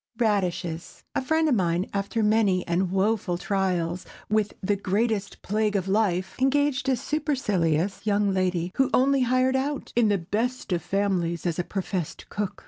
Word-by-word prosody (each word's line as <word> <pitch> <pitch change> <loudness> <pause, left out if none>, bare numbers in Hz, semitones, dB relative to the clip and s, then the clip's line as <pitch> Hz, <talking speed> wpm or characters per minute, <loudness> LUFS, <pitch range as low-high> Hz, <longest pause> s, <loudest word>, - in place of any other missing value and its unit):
RADISHES. 180 -7 -1
A - - 0
friend 315 +4 +1
of 295 - +3
mine, 180 -3 +1
after 200 +3 -1
many 210 -4 +2
and 175 +2 +1
woful 195 -2 +1
trials 180 -2 -1 0.3
with 215 -1 +1
"the 205 +2 0
greatest 200 +1 -1
plague 210 +1 0
of 190 -1 0
life," 190 -2 +1
engaged 270 -1 +2
a 260 - +3
supercilious 210 - 0
young 205 -2 +1
lady 180 -2 0
who 270 - +3
"only 270 +1 +3
hired 255 +1 +2
out 275 +2 -2
in 235 -2 +4
the 205 - +3
best 215 +8 -2
of 170 - 0
families 175 -3 -1
as 175 -1 -1
a - - +1
professed 185 -3 -4
cook." 205 -2 -3
200 Hz, 160 wpm, -26 LUFS, 180-240 Hz, 0.3 s, in